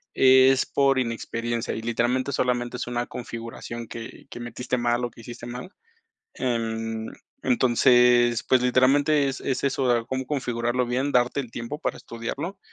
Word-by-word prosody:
es 130 0 +6
por 135 -1 +2
inexperiencia 115 -1 -2
y, - - -4
literalmente, 120 +3 0
solamente 125 -2 -1
es - - -4
una 120 0 -2
configuración 115 -1 -7
que 115 0 -9
que - - -7
metiste 120 +1 -3
mal 120 0 0
o 120 - -5
que 115 - -14
hiciste 120 +1 -9
mal. 125 +5 -7 0.7
Em, 115 -2 -2 0.4
entonces, 120 -1 +4
pues, 130 -1 +4
literalmente, 140 +4 +3
es 135 - -4
es 130 -1 -2
eso, 135 -1 +1
de 115 -1 0
cómo 130 0 -3
configurarlo 125 -3 -1
bien, 130 +4 0
darte 125 +2 +2
el 125 -4 -7
tiempo 120 +6 -5
para - - -2
estudiarlo. 140 +11 -6
120 Hz, 155 wpm, -25 LUFS, 120-130 Hz, 0.7 s, es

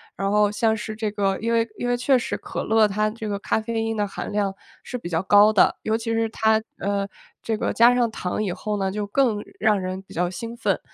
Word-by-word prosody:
然 195 0 -1
后 210 -1 +3
像 220 +1 +1
是 215 0 -5
这 215 -1 -2
个 195 -2 -1
因 230 +1 -1
为 230 0 +2
因 245 - -3
为 245 - +1
确 255 +1 +3
实 - - -3
可 - - -5
乐 220 -1 +4
它 215 +1 0
这 220 0 -6
个 200 -1 -2
咖 210 - 0
啡 225 0 -2
因 225 0 -2
的 205 -1 0
含 200 - -6
量 200 -2 0 0.3
是 - - -7
比 175 -8 -7
较 165 +1 0
高 205 +2 +6
的， 195 - +4
尤 220 - +1
其 230 0 -4
是 225 0 +1
它 220 0 +2 0.2
呃， 200 0 -1 0.4
这 225 - -1
个 - - -1
加 240 +2 +6
上 240 -2 +2
糖 215 0 -3
以 195 - -1
后 210 +3 -3
呢， 190 -1 -1
就 205 +1 -3
更 230 0 +2 0.2
让 215 -2 +3
人 185 0 -4
比 195 - -16
较 175 +1 +1
兴 230 +5 -6
奋， - - 0
215 Hz, 270 characters per minute, -23 LUFS, 200-225 Hz, 0.4 s, 高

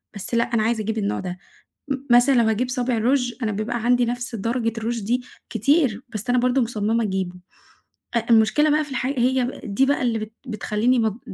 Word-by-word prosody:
بس 200 - -5
لأ 235 - +4
أنا 235 -3 0
عايزة 225 0 0
أجيب 220 +1 -3
النوع 205 -1 -1
ده. 180 -1 -5 0.5
م 275 - 0 0.2
مثلًا 260 +3 +5
لو 235 - +4
هاجيب 235 +3 0
صابع 250 -2 -1
روچ، 245 +1 +1
أنا 215 - 0
بيبقى 220 +3 -3
عندي 245 0 +3
نفس 245 0 -3
درجة 230 +2 -1
الروچ 230 +1 -2
دي 245 +4 +1 0.3
كتير، 250 - +2
بس 215 +1 -4
أنا 250 - +3
برضه 250 +2 +2
مُصمِّمة 225 0 0
أجيبه، 190 -3 -2 0.8
أ 230 -1 0
المشكلة 230 +7 +4
بقى 305 +1 +2
في 290 - -13
الحاج 260 +1 -2
هي 255 +1 +1
دي 210 +7 +1
بقى 285 0 +1
اللي 235 -3 +1
بت 215 0 -6
بتخليني 220 +2 0
مـض 220 -1 0
235 Hz, 200 wpm, -23 LUFS, 220-250 Hz, 0.8 s, مثلًا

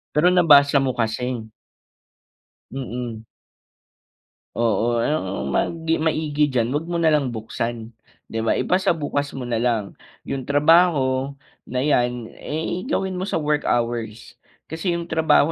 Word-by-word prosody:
Pero 160 +4 +4
nabasa 145 -5 +6
mo 135 -1 +1
kasi. 115 0 -2 1.2
Mm. 120 -3 -5 1.3
Oo, 115 +1 +1
ang 95 - -2
mag 115 - 0 0.2
maigi 155 -2 +1
diyan 125 -3 0
huwag 150 +4 -2
mo 175 - -3
nalang 150 -6 +2
buksan, 115 +1 -4 0.4
'di 115 - -2
ba - - +2
ipasabukas 155 -6 0
mo 130 - -5
nalang. 115 -3 -1 0.3
'Yung 135 -2 -5
trabaho, 145 -3 +3 0.3
na 125 +1 -1
'yan, 120 -5 0
eh, 165 - -4
gawin 190 -10 -1
mo 190 - -3
sa - - -2
work 150 0 0
hours. 115 -2 -2 0.3
Kasi 170 +2 -1
'yung 170 - -3
trabaho 160 -1 +3
135 Hz, 125 wpm, -22 LUFS, 120-160 Hz, 1.3 s, nabasa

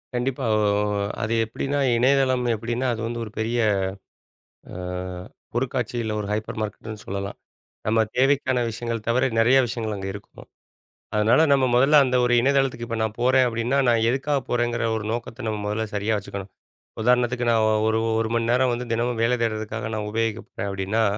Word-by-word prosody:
கண்டிப்பா, 130 +2 -1
ஒ 110 - +2 0.6
அது 110 +1 -1
எப்படின்னா, 135 +5 -2 0.2
இணையதளம் 130 0 +3
எப்படின்னா 120 +4 -3
அது 115 - -5
வந்து 120 0 -4
ஒரு 105 - -10
பெரிய 115 +2 0 1.1
அ - - -8 0.8
பொருட்காட்சி 125 -1 -1
இல்லை 110 -1 -2
ஒரு 105 - -4
ஹைப்பர் 110 +1 -3
மார்க்கெட்டுன்னு 110 0 -6
சொல்லலாம். 100 +1 -4 0.5
நம்ம 110 +1 +3 0.2
தேவைக்கான 130 -1 +2
விஷயங்கள் 115 -1 -4
தவிர 125 +3 +2
நிறைய 120 +4 +5
விஷயங்கள் 110 -2 -3
அங்க 95 0 -5
இருக்கும். 100 - -12 0.7
அதனால 110 +6 +4
நம்ம 135 -1 +4
முதல்ல 135 +5 +5
அந்த 130 -1 +1
ஒரு 125 - +2
இணையதளத்துக்கு 135 -2 +1
இப்ப 115 -1 -3
நான் 110 -1 -2
போறேன் 130 +1 +4
அப்படின்னா, 120 +3 0
நான் 115 -2 +3
எதுக்காக 140 +3 0
போறேங்கிற 120 -1 0
ஒரு 110 - -4
நோக்கத்தை 115 +1 -5
நம்ம 110 -1 -2
முதல்ல 105 +2 -1
சரியா 105 +2 0
வச்சுக்கணும். 100 -1 -7 0.5
உதாரணத்துக்கு 125 +1 +2
நான் 115 -1 +3 0.2
ஒரு 110 0 +2 0.2
1 110 0 -1
மணி 115 0 0
நேரம் 125 +1 +3
வந்து 120 +1 -3
தினமும் 120 0 -1
வேலை 120 +2 +3
தேடுறதுக்காக 110 -1 -2
நான் 105 -1 -3
உபயோகிக்க 115 0 -1
போறேன் 100 - -4
அப்படின்னா, 100 +3 0
115 Hz, 165 wpm, -24 LUFS, 110-125 Hz, 1.1 s, நிறைய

